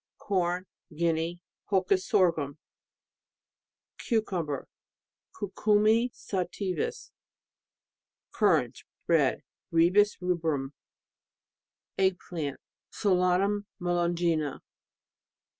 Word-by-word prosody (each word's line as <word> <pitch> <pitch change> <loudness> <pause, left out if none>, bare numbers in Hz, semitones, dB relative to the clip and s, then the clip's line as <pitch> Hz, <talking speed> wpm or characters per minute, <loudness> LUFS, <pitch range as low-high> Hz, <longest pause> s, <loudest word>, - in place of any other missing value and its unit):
Corn, 180 -2 -1 0.3
Guinea... 170 +1 0 0.2
Holcus 190 -1 +2
Sorghum. 160 -6 +2 1.4
Cucumber... 180 - -1 0.7
Cucumi 215 +4 +2
sativus, 185 -4 -3 1.2
Currants, - - +2 0.2
red - - +2 0.3
Ribes 185 +6 +4
rubrum. 160 -6 -1 1.3
Egg 190 -1 +3
plant.... 155 -7 -5 0.3
Solanum 195 +1 +1
melongena. 170 -4 0
180 Hz, 60 wpm, -29 LUFS, 165-195 Hz, 1.4 s, Ribes